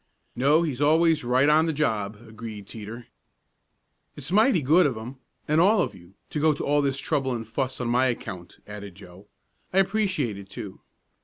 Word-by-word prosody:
"No, 145 +6 +3
he's 145 -5 -3
always 160 +1 +3
right 125 +3 +3
on 155 +2 +4
the - - +1
job," 110 -8 -1
agreed 110 -2 -9
Teeter. 115 +2 -8 1.1
"It's 145 +2 -6
mighty 215 - +4
good 160 +5 +5
of 130 -5 -3
him 120 +5 -8 0.3
and 155 +2 +3
all 210 +5 +4
of - - -4
you 90 +2 -17 0.2
to 150 - -2
go 155 +1 +4
to - - -4
all 145 +1 +2
this 140 -1 0
trouble 135 -1 -1
and 115 -2 -6
fuss 130 +3 -3
on 125 - -2
my 125 +2 +3
account," 95 -7 -5
added 100 -3 -9
Joe. 95 +1 -14 0.4
"I 185 - -2
appreciate 185 - +1
it, 95 -1 -12
too." 100 -1 -8
130 Hz, 185 wpm, -25 LUFS, 110-155 Hz, 1.1 s, good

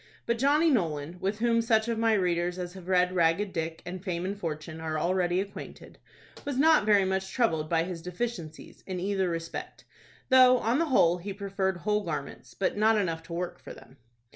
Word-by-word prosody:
But 235 0 -1
Johnny 300 +5 +4
Nolan, 165 - -1
with 195 +3 -2
whom 230 0 +2
such 225 -1 +2
of 230 -1 -1
my 225 0 +3
readers 175 -2 0
as 180 -1 -5
have 185 -2 -11
read 180 -1 +3
"Ragged 180 +3 +1
Dick" 165 0 -4
and 180 +1 -7
"Fame 180 -2 -3
and 195 +2 -2
Fortune" 160 -3 -6
are 160 -1 -2
already 180 +2 +1
acquainted, 200 +1 -8 0.4
was 280 -2 -3
not 305 -6 +4
very 205 -2 +5
much 190 0 -2
troubled 160 -11 0
by 165 -1 +2
his 175 -1 -6
deficiencies 180 -3 -6
in 185 -2 -4
either 190 0 0
respect, 165 0 -6 0.4
though 255 -1 +7
on 240 +3 0
the 335 - +2
whole 175 - +3
he 195 +3 -6
preferred 195 -1 -2
whole 210 +4 0
garments, 150 -6 -6
but 195 - -1
not 215 +1 +3
enough 165 -5 -1
to 165 +1 -10
work 175 +1 -4
for - - -10
them. 130 - -16
185 Hz, 195 wpm, -28 LUFS, 170-220 Hz, 0.4 s, though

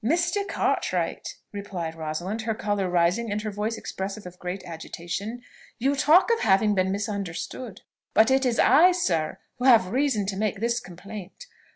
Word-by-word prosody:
"Mr. 345 - +1
Cartwright," - - -1 0.2
replied 190 -5 -5
Rosalind, 165 +7 -4
her 220 0 -2
colour 205 -3 -1
rising, 180 +6 +1
and 205 - 0
her 215 - -3
voice 210 +3 -2
expressive 195 +2 -5
of 180 0 -10
great 180 +2 -5
agitation, 175 +7 -6 0.3
"you 275 +4 +1
talk 315 +10 +5
of 460 - +2
having 205 +1 +3
been 190 -1 +1
misunderstood; 200 +2 -4 0.3
but 220 +4 +5
it 265 0 +3
is 245 -3 +1
I, 335 +8 +6
sir, 170 - 0 0.2
who 250 - -1
have 225 -8 +6
reason 255 -5 +1
to 195 0 -3
make 210 0 -1
this 235 +2 0
complaint. 200 - -10
210 Hz, 165 wpm, -26 LUFS, 185-245 Hz, 0.3 s, I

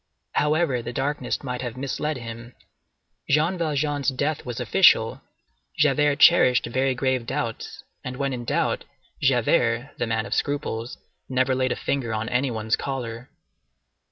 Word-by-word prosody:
However, 150 -4 +1
the 120 +1 -5
darkness 135 -1 -2
might 125 -2 -4
have 120 -1 -5
misled 140 +3 -2
him; 115 0 -9 0.7
Jean 155 +6 +3
Valjean's 145 -4 0
death 145 +3 -2
was 120 -2 -4
official; - - +4 0.6
Javert 150 0 +3
cherished 130 -6 +6
very 130 +2 0
grave 130 -2 0
doubts; 115 -1 -4 0.2
and 125 0 -6
when 140 -1 -1
in 120 -1 -4
doubt, - - 0 0.4
Javert, 120 -1 +2
the 120 - 0
man 110 0 -1
of - - -4
scruples, 135 -5 -2 0.3
never 130 0 +2
laid 130 0 0
a - - 0
finger 125 -5 -2
on 110 +1 -3
any 130 +2 +1
one's 110 -1 0
collar. 125 -2 -5
130 Hz, 145 wpm, -24 LUFS, 120-145 Hz, 0.7 s, cherished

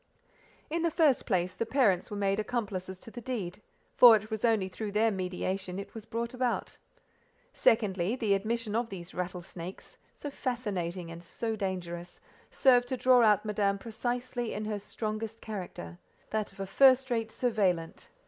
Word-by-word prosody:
In 335 +1 0
the 335 - +2
first 305 -5 +3
place, 185 -3 +1
the 185 - -2
parents 225 -6 +2
were 205 - -5
made 200 0 +1
accomplices 200 -5 -3
to 225 - -11
the 240 - -8
deed, 210 -7 -4 0.3
for 240 -2 +9
it 215 +1 -3
was 220 -1 -3
only 220 -5 +3
through 205 +2 -5
their 220 +2 +3
mediation 185 0 -3
it 200 - -7
was 225 -1 -9
brought 235 +2 -3
about. 250 -1 -2 0.7
Secondly: 205 -2 +2
the 220 -6 +1
admission 215 +2 -1
of 230 0 0
these 180 -3 -8
rattlesnakes, 180 0 -6 0.2
so 290 - -6
fascinating 190 -11 -3
and 170 +1 -9
so 225 +6 -3
dangerous, 175 -3 -4 0.3
served 245 -2 +4
to 260 - -2
draw 250 0 +5
out 215 -2 +4
Madame 200 -1 +1
precisely 240 +2 -3
in 210 +1 -3
her 210 -1 -2
strongest 215 +2 -4
character—that 200 +1 -6
of 195 - -20
a 195 - -2
first 260 +4 +5
rate 225 -2 0
surveillante. 195 -9 0
215 Hz, 160 wpm, -30 LUFS, 190-235 Hz, 0.7 s, for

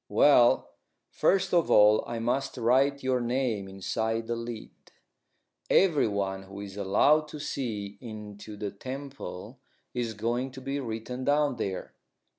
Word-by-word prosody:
"Well, 125 -5 +5 0.4
first 195 -1 +2
of 170 -2 +3
all 105 +1 +6
I 120 - -4
must 120 +4 -1
write 135 +4 +2
your 130 -1 +1
name 120 -5 -1
inside 110 +4 -2
the 120 - -2
lid. 115 -1 -6 1.0
Everyone 100 - +2
who 95 +1 -10
is 100 -1 -8
allowed 145 +10 +3
to 150 - -8
see 105 -8 -4
into 105 -2 -9
the 100 -1 -4
temple 130 -2 -8 0.3
is 120 -3 -2
going 120 +5 -1
to 130 - -9
be 135 +2 -3
written 120 +1 -5
down 145 -2 +2
there. 95 -4 -4
120 Hz, 135 wpm, -28 LUFS, 105-135 Hz, 1.0 s, all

